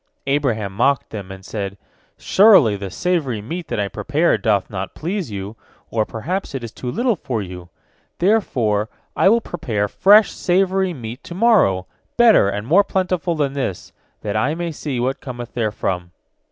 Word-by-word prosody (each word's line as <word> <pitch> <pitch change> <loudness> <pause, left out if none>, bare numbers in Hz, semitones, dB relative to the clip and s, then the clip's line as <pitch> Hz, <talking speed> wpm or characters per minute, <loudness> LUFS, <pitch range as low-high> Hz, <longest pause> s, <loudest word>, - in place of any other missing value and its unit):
Abraham 125 -8 0
mocked 125 +6 +1
them, 100 -3 -7
and 95 0 -10
said, 100 -2 -5 0.4
"Surely, 190 - +5
the 100 -1 -5
savory 145 - -1
meat 165 +11 -6
that - - -3
I 100 - 0
prepared 150 - 0
doth 105 -4 +1
not 95 -1 -6
please 180 - -3
you, 100 +1 -6 0.4
or 110 -2 0
perhaps 165 - -4
it 130 - -4
is 115 - -6
too 125 - -6
little 240 - +1
for 125 - -3
you! 90 -2 -9 0.5
Therefore 125 - +1 0.3
I - - +4
will 230 +2 +4
prepare 110 - -2
fresh 205 - +5
savory 190 +1 +1
meat 120 -4 -8
to 170 - -8
morrow, 185 - +3 0.3
better 230 - +6
and 105 +1 -4
more 180 - +5
plentiful 185 -4 -1
than 145 -3 0
this, 130 -10 -4 0.3
that 105 -1 -3
I 130 +9 +1
may 170 0 -3
see 145 -4 -4
what 130 +2 -1
cometh 120 -2 -7
therefrom." 105 -6 -2
130 Hz, 165 wpm, -20 LUFS, -, 0.5 s, better